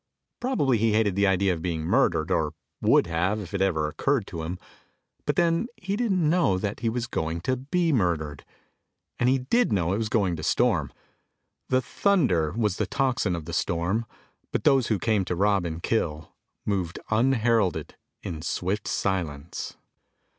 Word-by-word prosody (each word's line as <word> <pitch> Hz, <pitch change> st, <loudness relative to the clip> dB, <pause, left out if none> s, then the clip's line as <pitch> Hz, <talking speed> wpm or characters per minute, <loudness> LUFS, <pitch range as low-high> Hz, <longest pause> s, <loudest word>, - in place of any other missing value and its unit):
Probably 145 Hz, -, +1 dB
he 110 Hz, 0 st, +2 dB
hated 105 Hz, -3 st, +2 dB
the 100 Hz, 0 st, +3 dB
idea 95 Hz, 0 st, +2 dB
of 80 Hz, -, -5 dB
being 80 Hz, -2 st, -2 dB
murdered, 80 Hz, +1 st, +2 dB
or 80 Hz, -3 st, +1 dB, 0.3 s
would -, -, +4 dB
have 90 Hz, +5 st, 0 dB
if 95 Hz, -3 st, -8 dB
it 100 Hz, -, -1 dB
ever 80 Hz, -6 st, +1 dB
occurred 110 Hz, -, 0 dB
to 85 Hz, -4 st, -6 dB
him. 85 Hz, +3 st, -4 dB, 0.7 s
But -, -, +1 dB
then 170 Hz, +5 st, +2 dB
he 195 Hz, +1 st, -3 dB
didn't 195 Hz, -8 st, +1 dB
know 160 Hz, -, +3 dB
that 105 Hz, +2 st, -3 dB
he 115 Hz, -, 0 dB
was 120 Hz, +1 st, -2 dB
going 80 Hz, -6 st, -2 dB
to 130 Hz, +8 st, 0 dB
be 160 Hz, +6 st, 0 dB
murdered, 80 Hz, -, 0 dB, 0.8 s
and 125 Hz, -, +3 dB
he 135 Hz, -, +4 dB
did 230 Hz, -, +1 dB
know 90 Hz, -3 st, +1 dB
it 100 Hz, -, 0 dB
was 110 Hz, -1 st, -1 dB
going 100 Hz, -6 st, +1 dB
to -, -, -6 dB
storm. -, -, +1 dB, 0.8 s
The 130 Hz, 0 st, +2 dB
thunder 125 Hz, -, +2 dB
was 105 Hz, -4 st, 0 dB
the -, -, -1 dB
tocsin 125 Hz, -9 st, 0 dB
of 85 Hz, -2 st, -6 dB
the 85 Hz, -, -7 dB
storm, 90 Hz, +7 st, 0 dB, 0.4 s
but -, -, -1 dB
those 135 Hz, -4 st, +4 dB
who 110 Hz, -, +1 dB
came 105 Hz, 0 st, +1 dB
to 90 Hz, -, -2 dB
rob 100 Hz, 0 st, +2 dB
and 80 Hz, 0 st, -5 dB
kill 80 Hz, -8 st, -1 dB, 0.3 s
moved 95 Hz, -5 st, -1 dB
unheralded 115 Hz, -4 st, +2 dB, 0.3 s
in 80 Hz, -2 st, -5 dB
swift 95 Hz, +5 st, -2 dB
silence. 85 Hz, -5 st, -3 dB
100 Hz, 175 wpm, -26 LUFS, 85-125 Hz, 0.8 s, would